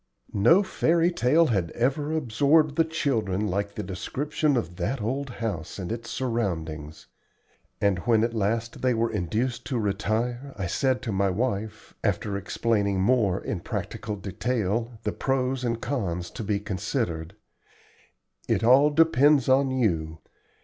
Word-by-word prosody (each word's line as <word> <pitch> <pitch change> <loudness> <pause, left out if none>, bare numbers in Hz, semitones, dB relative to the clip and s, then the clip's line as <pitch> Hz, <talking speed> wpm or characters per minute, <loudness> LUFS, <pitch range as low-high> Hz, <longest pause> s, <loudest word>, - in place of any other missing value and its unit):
No 160 - +5
fairy 170 -2 +2
tale 160 +2 +3
had 95 - 0
ever 140 +5 0
absorbed 145 +2 +2
the 165 - +4
children 115 - -1
like 100 +1 -2
the - - -3
description 140 - -1
of 90 -6 -3
that 110 +9 -1
old 135 +6 -2
house 105 -9 -4
and 95 0 -5
its 115 0 -5
surroundings; 80 - -3 0.7
and 100 -3 +2
when 115 +3 +2
at 115 0 0
last 115 +2 -1
they 125 -2 +2
were 115 0 0
induced 115 +5 -1
to 130 - -1
retire 115 +6 -2
I 95 - -2
said 130 +7 0
to 115 - -2
my 100 0 +1
wife, 105 +1 -3
after 100 - 0
explaining 100 0 0
more 100 -2 +2
in - - -3
practical 105 -1 -4
detail 115 +3 -2
the 105 - 0
pros 130 -1 -1
and 115 -1 -1
cons 90 -12 -3
to - - -6
be 100 -1 0
considered: 85 -3 -3 1.1
"It - - +1
all 130 +5 +6
depends 150 -3 +4
on 135 +1 +4
you. 85 -11 0
115 Hz, 145 wpm, -26 LUFS, 100-130 Hz, 1.1 s, all